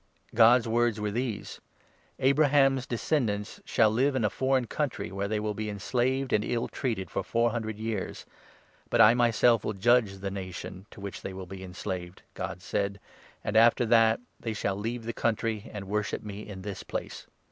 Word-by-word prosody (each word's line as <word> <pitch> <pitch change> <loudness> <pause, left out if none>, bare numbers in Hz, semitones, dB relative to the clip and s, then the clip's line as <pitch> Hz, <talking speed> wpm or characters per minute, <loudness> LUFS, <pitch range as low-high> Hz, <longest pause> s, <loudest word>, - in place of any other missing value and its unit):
God's 115 +1 +6
words 115 -1 +1
were 105 0 -1
6 - - -7
these 120 -2 -3 0.2
— - - -34
' - - -37
Abraham's 135 -2 +3
descendants 110 -4 -1
shall 110 -2 +3
live 135 +5 +2
in 120 -4 +1
a 105 - +1
foreign 130 0 +1
country, 145 +3 -3
where 100 +1 -2
they 105 +1 -1
will 105 0 -2
be 105 +1 -4
enslaved 125 +6 -1
and 105 - +3
ill 120 +1 -1
treated 110 -9 -3
for 95 - -1
four 115 +3 +1
hundred 110 -2 -3
years. 110 -3 -4 0.6
But - - +1
I 110 - +8
myself 120 -2 +3
will 110 - -2
judge 110 +1 +3
the 100 0 -4
nation, 95 0 -7
to - - -14
which 100 -2 -6
they 95 - -6
will 95 0 -7
7 95 +2 -9
be 95 - -9
enslaved,' 90 -1 -6
God - - -5
said, 100 0 -2 0.4
'and 105 - -3
after 115 +2 +6
that 115 -1 +4 0.2
they 115 - -3
shall 100 -2 -1
leave 115 +4 -4
the 115 - -3
country 110 -2 -1
and 100 -3 -7
worship 105 +1 -2
me 105 0 -7
in 95 -3 -8
this 100 -2 -5
place.'' - - -6
110 Hz, 195 wpm, -28 LUFS, 100-120 Hz, 0.6 s, I